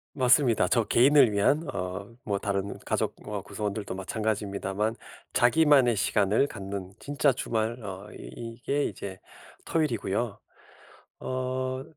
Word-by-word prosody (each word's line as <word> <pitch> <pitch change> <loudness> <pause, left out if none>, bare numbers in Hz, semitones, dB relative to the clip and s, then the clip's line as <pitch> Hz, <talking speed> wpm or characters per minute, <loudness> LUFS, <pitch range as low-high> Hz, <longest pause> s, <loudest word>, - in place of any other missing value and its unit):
맞습니다. 125 -6 +4
저 115 +2 +3
개인을 130 -1 +5
위한 140 +11 +2
어 95 +1 -3 0.2
뭐 100 -2 -1
다른 100 0 -2
가족 - - -1
어 105 -2 -3
구성원들도 100 -1 -4
마찬가지입니다만 105 +1 -2 0.4
자기만의 135 -2 +5
시간을 105 +5 +2
갖는 95 -2 -6
진짜 140 -1 +2
주말 115 0 -2
어 100 +1 -7
이게 125 +5 -3
이제 95 -2 -6 0.5
토요일이고요. 120 -8 -1 0.8
어 130 0 -2
110 Hz, 275 characters per minute, -28 LUFS, 100-130 Hz, 0.8 s, 개인을